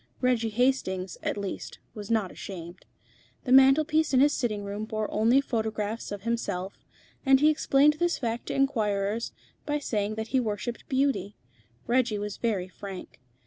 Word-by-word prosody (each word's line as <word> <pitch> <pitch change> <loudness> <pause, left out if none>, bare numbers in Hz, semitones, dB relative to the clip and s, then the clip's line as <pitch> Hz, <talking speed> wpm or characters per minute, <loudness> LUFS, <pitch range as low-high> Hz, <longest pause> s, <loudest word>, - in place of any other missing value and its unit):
Reggie 245 -3 +1
Hastings, 210 -6 0
at - - -2
least, 200 -2 -5 0.2
was 210 -2 -8
not 220 -5 +1
ashamed. 175 -2 -9 0.6
The 250 - -3
mantel 270 +3 +7
piece 310 -2 +1
in - - +6
his 290 +2 +5
sitting 215 -7 -1
room 200 +1 -4
bore 215 -1 -2
only 230 +6 +4
photographs 220 -4 -3
of 205 -1 -6
himself, 200 -5 -3 0.4
and 270 -1 +5
he 305 +2 +5
explained 300 0 +3
this 345 0 +1
fact 235 -1 -3
to - - -3
inquirers 220 -5 0 0.3
by 295 0 -1
saying 215 -7 -2
that 220 0 -4
he 265 - +2
worshipped 225 0 -4
beauty. 265 -6 0 0.5
Reggie 240 -3 +1
was 205 0 -4
very 205 -6 -1
frank. 190 -2 -9
225 Hz, 160 wpm, -27 LUFS, 205-265 Hz, 0.6 s, mantel